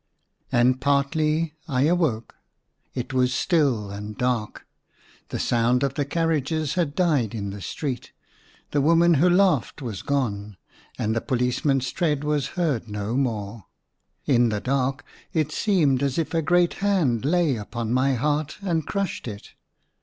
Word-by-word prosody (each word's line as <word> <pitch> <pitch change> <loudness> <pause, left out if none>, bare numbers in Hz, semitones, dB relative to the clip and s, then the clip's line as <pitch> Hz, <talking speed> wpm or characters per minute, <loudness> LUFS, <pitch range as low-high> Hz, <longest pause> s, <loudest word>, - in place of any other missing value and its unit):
And 125 +2 +3
partly 150 +3 +1
I 130 -4 +1
awoke. 150 -8 +1 0.6
It 125 +1 -4
was 130 0 +2
still 135 - +1
and 105 +1 -7
dark; 125 -4 -2 0.6
the - - -3
sound 120 +2 +2
of 135 -1 0
the 145 0 -1
carriages 155 -1 0
had 165 -6 -1
died 145 - +1
in 100 -2 -4
the 100 0 -8
street; 130 - -4 0.6
the 145 - +2
woman 170 +3 +5
who 165 +4 +4
laughed 180 - +2
was 115 -8 -5
gone; 105 -8 -2 0.4
and 110 +1 -1
the 115 - 0
policeman's 130 +1 0
tread 150 -4 0
was 150 -2 0
heard 145 -11 0
no 105 +2 -3
more. 110 - -2 0.6
In 120 -4 +3
the 105 -1 -1
dark 135 +3 -1 0.3
it 155 -2 0
seemed 155 -10 +2
as 140 -2 0
if 165 0 -1
a 165 - +2
great 175 +3 +3
hand 170 - +2
lay 160 -1 +2
upon 115 +2 -4
my 130 +1 +2
heart, 150 +4 -1
and 165 -5 -1
crushed 195 -9 -3
it. 105 -3 -8
135 Hz, 150 wpm, -24 LUFS, 120-155 Hz, 0.6 s, woman